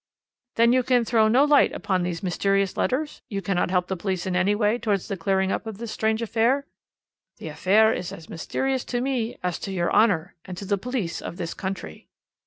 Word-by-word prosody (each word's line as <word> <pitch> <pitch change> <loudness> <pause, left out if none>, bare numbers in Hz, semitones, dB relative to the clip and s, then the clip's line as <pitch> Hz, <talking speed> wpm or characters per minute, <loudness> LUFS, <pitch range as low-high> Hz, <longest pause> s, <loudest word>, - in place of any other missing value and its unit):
"'Then 235 +1 +4
you 255 - +4
can 245 -1 +2
throw 220 -2 +3
no 245 +6 +5
light 295 -1 +5
upon 185 -2 -1
these 175 0 -3
mysterious 195 +1 +1
letters? 295 +4 -1
You 200 -4 -2
cannot 195 -3 0
help 180 -1 +1
the 190 - -2
police 185 -1 -3
in 185 -1 -2
any 190 +3 +2
way 215 +2 +1
towards 205 -5 -1
the 200 - -3
clearing 190 +2 0
up 225 - -3
of 220 -3 -6
this 230 0 -6
strange 220 +1 0
affair?' 235 +5 +1 0.7
"'The - - -7
affair 220 +4 +3
is 175 - -4
as 160 - -10
mysterious 265 +10 -2
to 245 - -2
me 245 -3 -2
as 180 -2 -2
to 195 - -5
your 175 -2 -1
Honour, 195 -5 +3
and 180 -1 -8
to 200 - -6
the 200 0 0
police 235 -6 -3
of 170 - -7
this 170 -2 -4
country.' 190 - -6
200 Hz, 210 wpm, -24 LUFS, 185-235 Hz, 0.7 s, no